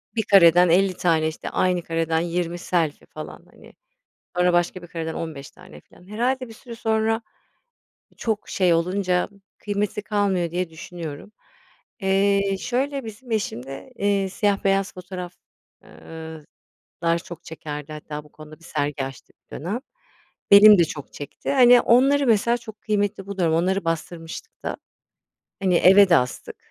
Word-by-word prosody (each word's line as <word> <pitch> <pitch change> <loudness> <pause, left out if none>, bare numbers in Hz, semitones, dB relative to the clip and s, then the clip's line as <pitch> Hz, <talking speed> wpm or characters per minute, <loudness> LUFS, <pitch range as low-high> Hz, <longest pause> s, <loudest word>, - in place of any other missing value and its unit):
1 220 - +1
kareden 175 -2 +6
50 185 +3 +3
tane 160 -3 +2
işte 160 - -5
aynı 180 -1 0
kareden 165 0 0
20 175 0 -2
selfie 165 -4 -1
falan, - - -10
hani, - - -17 0.6
sonra 180 0 +3
başka 175 +1 +1
bir - - -10
kareden 165 -1 -5
15 155 -5 -6
tane, 75 0 -15
filan, 180 - -21
herhâlde 250 +5 -1
bir - - -10
süre 235 +1 -11
sonra 225 0 0 1.0
çok 220 -3 -2
şey 180 -3 +2
olunca 180 +1 0 0.3
kıymeti 205 0 -2
kalmıyor 200 -5 0
diye 175 0 -2
düşünüyorum. 160 +2 -8 0.7
Eee, 195 0 +2
şöyle, 270 +2 -2
bizim 225 +3 -10
eşim 205 - -2
de, 135 - -9
eee, 200 -2 +1
siyah 200 +1 0
beyaz 195 0 +1
fotoğraf 180 -1 -8 0.5
eee, 160 -1 -10 0.6
lar 170 0 +3
çok 170 0 -11
çekerdi 150 -2 -7
hatta 150 0 -7
bu 150 - -20
konuda 155 0 -13
bir 165 - -20
sergi 145 -3 -2
açtık 135 -2 -11
bir - - -9
dönem. 185 - -3 0.7
Benim 205 0 +10
de 170 - +6
çok 155 -4 -8
çekti, 145 - -6
hani, 245 -2 +7
onları 275 +4 +4
mesela 235 +1 +3
çok 220 -3 -12
kıymetli 205 -2 -1
buluyorum, 185 -5 0
onları 185 +3 0
bastırmıştık 165 - -5
da. - - -3 0.9
Hani, 185 -2 +3
eve 195 +3 +7
de 170 - +6
astık. 125 0 -3
180 Hz, 150 wpm, -23 LUFS, 165-210 Hz, 1.0 s, Benim